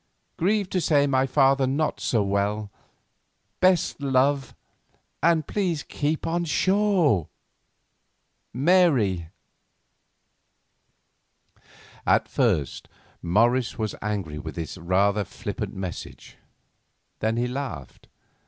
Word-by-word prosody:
Grieved 200 Hz, +2 st, 0 dB
to 185 Hz, -, 0 dB
say 145 Hz, -3 st, +3 dB
my 135 Hz, -1 st, +2 dB
father 135 Hz, 0 st, +3 dB
not 145 Hz, +4 st, -1 dB
so 110 Hz, -4 st, +1 dB
well. 100 Hz, +1 st, -1 dB, 0.9 s
Best 185 Hz, -5 st, +2 dB
love, 135 Hz, 0 st, +1 dB, 0.7 s
and 165 Hz, -2 st, +3 dB
please 175 Hz, -6 st, -1 dB
keep 150 Hz, +1 st, -2 dB
on 170 Hz, +1 st, 0 dB
shore. 180 Hz, -, +2 dB, 1.2 s
MARY." 130 Hz, -, +2 dB, 2.8 s
At -, -, +3 dB
first 70 Hz, -3 st, 0 dB, 0.3 s
Morris 115 Hz, +7 st, +2 dB
was 110 Hz, -2 st, -2 dB
angry 100 Hz, -8 st, -3 dB
with 80 Hz, +1 st, -7 dB
this 85 Hz, -2 st, -5 dB
rather 95 Hz, +4 st, +1 dB
flippant 100 Hz, +2 st, -6 dB
message; 95 Hz, -3 st, -7 dB, 0.8 s
then 110 Hz, +1 st, 0 dB
he 120 Hz, +1 st, 0 dB
laughed. 125 Hz, -, -6 dB
130 Hz, 95 wpm, -25 LUFS, 100-155 Hz, 2.8 s, say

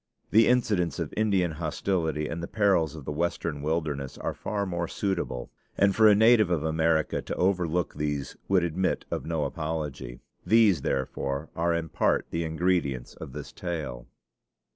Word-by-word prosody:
The 110 Hz, 0 st, +6 dB
incidents 100 Hz, -, +2 dB
of -, -, -4 dB
Indian 100 Hz, -6 st, +2 dB
hostility 80 Hz, 0 st, -1 dB
and 85 Hz, +2 st, -4 dB
the 85 Hz, -, -4 dB
perils 90 Hz, -8 st, +2 dB
of 75 Hz, -4 st, -9 dB
the -, -, -3 dB
Western 80 Hz, -1 st, -2 dB
wilderness 75 Hz, -3 st, -2 dB
are -, -, -3 dB
far 100 Hz, -1 st, -3 dB
more 85 Hz, -2 st, -2 dB
suitable, 85 Hz, -12 st, -3 dB, 0.3 s
and 100 Hz, -1 st, +3 dB
for 110 Hz, -1 st, +6 dB
a 105 Hz, -, +7 dB
native 110 Hz, -2 st, +5 dB
of 85 Hz, -4 st, 0 dB
America 80 Hz, 0 st, +1 dB
to -, -, -5 dB
overlook 90 Hz, -2 st, +1 dB
these 75 Hz, -2 st, -3 dB
would 95 Hz, -2 st, +3 dB
admit 90 Hz, +3 st, -1 dB
of -, -, -3 dB
no 80 Hz, -2 st, 0 dB
apology. 75 Hz, -6 st, -4 dB, 0.2 s
These 105 Hz, -5 st, +4 dB
therefore 70 Hz, +3 st, -2 dB
are 85 Hz, +1 st, +1 dB
in 80 Hz, -1 st, -3 dB
part -, -, +1 dB
the 85 Hz, -, -1 dB
ingredients 80 Hz, -6 st, 0 dB
of 65 Hz, -, -9 dB
this 75 Hz, 0 st, -7 dB
tale." 75 Hz, -9 st, -5 dB
85 Hz, 165 wpm, -27 LUFS, 75-95 Hz, 0.3 s, a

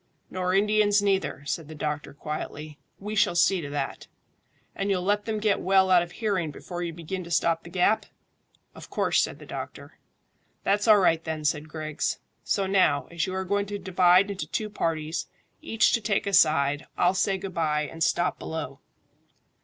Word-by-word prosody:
"Nor 185 Hz, 0 st, -1 dB
Indians 205 Hz, 0 st, +3 dB
neither," 195 Hz, -8 st, 0 dB
said 150 Hz, +2 st, -3 dB
the 155 Hz, -, -9 dB
doctor 150 Hz, 0 st, -3 dB
quietly. 150 Hz, +1 st, -6 dB, 0.2 s
"We 210 Hz, +2 st, -5 dB
shall 200 Hz, -4 st, +2 dB
see 180 Hz, +1 st, +3 dB
to 145 Hz, -, -6 dB
that." 145 Hz, -1 st, -4 dB, 0.7 s
"And 195 Hz, +1 st, -2 dB
you'll 185 Hz, -2 st, +1 dB
let 205 Hz, +2 st, +1 dB
them 220 Hz, -1 st, -2 dB
get 210 Hz, -1 st, +1 dB
well 190 Hz, 0 st, +3 dB
out 180 Hz, -1 st, +7 dB
of 175 Hz, 0 st, -6 dB
hearing 195 Hz, -8 st, -1 dB
before 175 Hz, +4 st, -7 dB
you 170 Hz, -1 st, -2 dB
begin 170 Hz, +3 st, -6 dB
to 170 Hz, -, -10 dB
stop 165 Hz, -1 st, +1 dB
the -, -, -12 dB
gap?" 205 Hz, +4 st, +2 dB, 0.7 s
"Of -, -, -12 dB
course," -, -, +2 dB
said -, -, -2 dB
the -, -, -12 dB
doctor. -, -, -8 dB, 0.6 s
"That's 205 Hz, +2 st, +1 dB
all 215 Hz, -1 st, +8 dB
right, 165 Hz, -4 st, +3 dB
then," 160 Hz, -2 st, -4 dB
said 150 Hz, 0 st, 0 dB
Griggs. 155 Hz, -1 st, -3 dB, 0.3 s
"So 195 Hz, -, 0 dB
now, 190 Hz, -7 st, +2 dB
as 170 Hz, +1 st, -1 dB
you 185 Hz, -, -4 dB
are 190 Hz, 0 st, -2 dB
going 200 Hz, +2 st, 0 dB
to 205 Hz, 0 st, -4 dB
divide 185 Hz, +1 st, +4 dB
into 195 Hz, -, -5 dB
two 215 Hz, -2 st, -3 dB
parties, 160 Hz, -3 st, -2 dB, 0.3 s
each 225 Hz, 0 st, +2 dB
to 230 Hz, -, +2 dB
take 210 Hz, -2 st, 0 dB
a 200 Hz, -, -2 dB
side, 145 Hz, -3 st, +3 dB
I'll 180 Hz, +1 st, +3 dB
say 190 Hz, 0 st, +1 dB
good 190 Hz, 0 st, -7 dB
bye 150 Hz, -2 st, 0 dB
and 165 Hz, +3 st, -3 dB
stop 175 Hz, +2 st, +1 dB
below." 150 Hz, -4 st, -5 dB
180 Hz, 190 wpm, -26 LUFS, 155-200 Hz, 0.7 s, all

